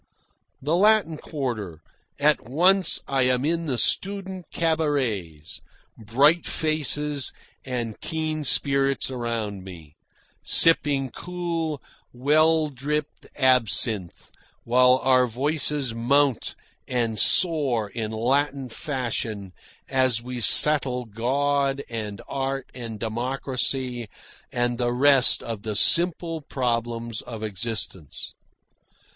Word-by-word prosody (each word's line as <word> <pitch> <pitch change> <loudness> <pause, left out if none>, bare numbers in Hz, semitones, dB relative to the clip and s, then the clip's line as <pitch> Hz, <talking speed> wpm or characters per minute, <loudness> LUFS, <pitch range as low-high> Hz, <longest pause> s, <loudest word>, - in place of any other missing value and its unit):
The 150 +4 0
Latin 205 -4 +3
Quarter 115 - -5 0.4
at 145 -6 +1
once 180 +7 +3
I 135 -1 0
am 125 +1 0
in 165 +1 -1
the 135 -5 -2
student 190 +3 -1
cabarets, 130 - -2 0.3
bright 140 +10 +2
faces 150 -2 -1 0.3
and 120 -4 -5
keen 155 -1 -3
spirits 135 -1 +3
around 115 -6 -4
me, 85 -6 -12 0.5
sipping 140 -5 +4
cool, 170 -4 -4 0.3
well 155 +4 +2
dripped 150 +3 -4
absinthe 115 -7 +1 0.3
while 125 +2 +4
our 130 -1 +3
voices 140 +1 0
mount 135 +3 +1 0.3
and 115 -4 -2
soar 140 - +3
in 110 +1 -5
Latin 135 +4 -1
fashion 115 - -4 0.3
as 130 -3 +1
we 125 +1 -7
settle 130 0 +5
God 140 +5 -1
and 105 -3 -6
art 135 -1 -4
and 115 -4 -8
democracy 125 +1 -3 0.4
and 120 -1 -1
the 120 -1 0
rest 135 0 +4
of 115 -3 -6
the 105 0 -5
simple 165 - +3
problems 115 -4 -3
of 115 -3 -9
existence. 105 - -4
130 Hz, 100 wpm, -24 LUFS, 115-150 Hz, 0.5 s, settle